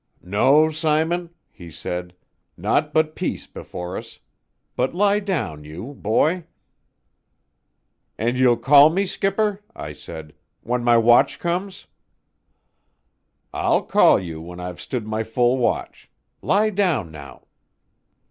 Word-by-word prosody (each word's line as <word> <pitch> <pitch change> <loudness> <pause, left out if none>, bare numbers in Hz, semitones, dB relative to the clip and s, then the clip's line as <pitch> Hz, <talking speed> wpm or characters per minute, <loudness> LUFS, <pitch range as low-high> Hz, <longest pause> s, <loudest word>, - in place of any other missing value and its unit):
"No, 140 - +3
Simon," 160 +3 0 0.2
he 85 -4 -12
said 90 +2 -6 0.4
"naught 150 0 0
but 155 0 +1
peace - - -3
before 90 +1 -8
us. - - -9 0.6
But 130 +6 -1
lie 205 +2 +3
down 150 - -3
you, 90 - -8
boy." 155 - 0 1.7
"And 120 +3 0
you''ll 125 -2 +4
call 140 +5 +7
me, 190 +5 0
skipper," 200 +2 -1
I 75 - -7
said, 75 0 -10 0.3
"when 120 +1 -2
my 120 -1 +5
watch 120 +1 +4
comes?" 185 +3 -3 1.7
"I'll - - +1
call - - +5
you 80 -3 -7
when 90 +2 -10
I've 90 0 -7
stood 120 -4 -4
my 110 0 -2
full 120 +3 +1
watch. 120 - -2 0.3
Lie 215 +2 +2
down 175 - 0
now." 75 -3 -12
125 Hz, 120 wpm, -22 LUFS, -, 1.7 s, call